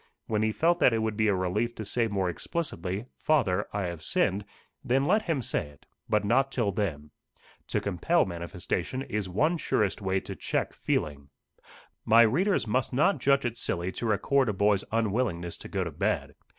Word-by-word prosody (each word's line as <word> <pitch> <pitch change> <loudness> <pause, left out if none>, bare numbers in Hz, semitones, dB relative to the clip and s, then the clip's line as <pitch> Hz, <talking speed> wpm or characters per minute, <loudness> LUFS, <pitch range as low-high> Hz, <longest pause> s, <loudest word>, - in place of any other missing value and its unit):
When 110 -1 0
he 110 0 +2
felt 170 +8 +2
that 125 - +5
it 110 -1 0
would 110 -1 -1
be 110 0 +2
a 100 - +3
relief 105 +6 -1
to 110 - -6
say 115 +3 0
more 100 -3 -1
explicitly, 95 - -3
"Father, 105 -11 +2
I 100 -1 -2
have 85 -3 -4
sinned," 100 +6 0 0.4
then 135 +1 +2
let 210 +7 +3
him 160 - -1
say 75 - -1
it; 75 -1 -18 0.2
but 105 -1 +2
not 135 +6 +2
till 115 -6 0
then. 80 -7 -3 0.6
To - - 0
compel - - +1
manifestation 90 +7 -3
is 105 -6 -3
one 155 - +1
surest 105 - 0
way 95 0 +1
to - - -7
check - - -2
feeling. 70 -2 -2 0.7
My 115 +1 +7
readers 175 - +2
must 125 +3 0
not 185 +9 +3
judge 140 -1 +3
it 120 -1 -2
silly 85 +2 -1
to 115 - -4
record 130 +4 +2
a - - 0
boy's 100 0 +2
unwillingness 105 -6 0
to - - -8
go - - -1
to - - -4
bed. - - -1
105 Hz, 190 wpm, -28 LUFS, 95-130 Hz, 0.7 s, My